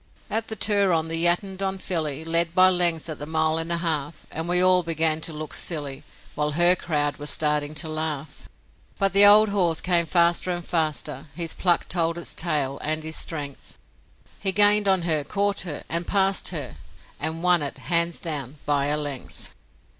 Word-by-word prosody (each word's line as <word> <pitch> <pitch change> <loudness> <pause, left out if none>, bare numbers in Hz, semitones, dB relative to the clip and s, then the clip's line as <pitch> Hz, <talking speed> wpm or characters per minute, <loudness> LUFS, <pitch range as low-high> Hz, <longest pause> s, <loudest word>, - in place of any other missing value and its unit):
At 225 0 -1
the 220 - -5
Turon 190 -6 +2
the 165 +1 -1
Yattendon 190 +2 -1
filly 160 -5 -3
Led 165 +1 +1
by 185 0 +7
lengths 175 -3 +1
at 155 -3 -6
the 145 - -7
mile 160 0 0
and 165 +1 -4
a 170 - +1
half, 155 -3 -3
And 165 +2 -4
we 180 0 +2
all 185 0 +5
began 160 -1 -1
to 165 - -2
look 155 -1 -7
silly, 145 -4 -4 0.3
While 150 0 -1
HER 175 +3 +5
crowd 145 -4 -1
were 145 - -7
starting 150 0 0
to 160 +2 -1
laugh; 155 -2 -6 0.5
But 195 -2 +1
the 200 +1 +8
old 210 +1 +7
horse 180 -5 0
came 175 -2 0
faster 170 +1 +1
and 175 -1 -3
faster, 155 -3 -2
His 170 -2 -2
pluck 175 -2 +1
told 170 -1 -1
its 170 - -2
tale, 145 -5 -1
and 155 +1 -3
his 160 0 -3
strength, 145 -4 -4 0.6
He 195 - 0
gained 205 +1 +4
on 190 -3 +2
her, 155 -3 +1
caught 200 +5 -1
her, 165 -6 -4
and 170 +1 -3
passed 195 -1 +1
her, 150 -8 -4 0.4
And 160 +2 -3
won 180 -2 +3
it, 145 - -4
hands 170 0 0
down, 150 -5 -4
by 145 -1 0
a 150 +1 0
length. 145 -3 -7
165 Hz, 185 wpm, -23 LUFS, 155-180 Hz, 0.6 s, the